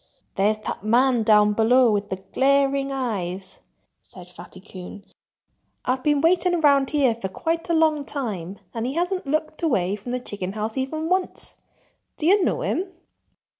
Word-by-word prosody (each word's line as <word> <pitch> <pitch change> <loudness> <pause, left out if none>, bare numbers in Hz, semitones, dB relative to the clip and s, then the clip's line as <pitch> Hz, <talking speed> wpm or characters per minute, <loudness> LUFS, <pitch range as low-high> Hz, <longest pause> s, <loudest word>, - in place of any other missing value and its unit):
"There's 210 +2 +2
that - - -4
man 240 +2 +3
down 210 -1 +4
below, 235 +3 +4
with 205 -1 -1
the - - -2
glaring 275 +7 +1
eyes—" 195 -8 -4 0.4
said 180 -1 -14
Fatty 180 +1 -12
Coon. 190 +1 -11 0.8
"I've 255 +1 0
been 295 -2 +2
waiting 355 +2 +3
around 280 -4 +3
here 280 -5 +2
for 225 -4 -5
quite 330 - -3
a 335 - +2
long 310 -2 +2
time 200 - -4 0.2
and 230 +1 -3
he 265 - -4
hasn't 355 -1 -1
looked 310 +2 -2
away 200 - +1
from 210 +4 -8
the 250 - -1
chicken 200 -5 -6
house 215 +1 -3
even 310 +4 -2
once.... 370 +1 -2 0.6
Do 300 - -3
you 390 +3 +5
know - - 0
him?" 370 +1 -2
255 Hz, 165 wpm, -23 LUFS, 205-300 Hz, 0.8 s, you